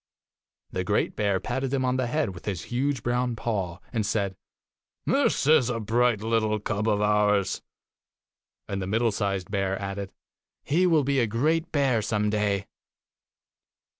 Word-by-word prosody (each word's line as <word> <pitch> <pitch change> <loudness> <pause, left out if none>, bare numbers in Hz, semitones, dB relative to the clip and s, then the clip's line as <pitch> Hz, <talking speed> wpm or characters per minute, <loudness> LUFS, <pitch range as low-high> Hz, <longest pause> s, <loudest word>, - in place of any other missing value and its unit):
The - - -2
great - - 0
bear 100 -2 +1
patted 130 +4 -2
him 135 -2 +1
on 125 0 +1
the 130 -1 0
head 140 -3 0
with 85 - -11
his 95 -5 -3
huge 135 0 0
brown 120 0 0
paw, 100 -7 -2 0.2
and 110 -3 +1
said, 100 -2 -1 0.7
'This - - +2
is 150 -4 +5
a 120 -2 -1
bright 115 0 +2
little 110 -1 +1
cub 105 +1 -2
of 105 -2 +2
ours.' 105 -2 +2 1.1
And 100 -1 -3
the 95 - -3
middle 115 +3 +2
sized 100 -3 -2
bear 95 -1 0
added, 100 0 -4 0.5
'He 175 +6 +2
will 160 -4 +4
be 140 0 +1
a 120 - +2
great 155 +9 0
bear 135 -6 +2
some 105 -1 0
day. 100 -2 0
110 Hz, 160 wpm, -26 LUFS, 100-125 Hz, 1.1 s, is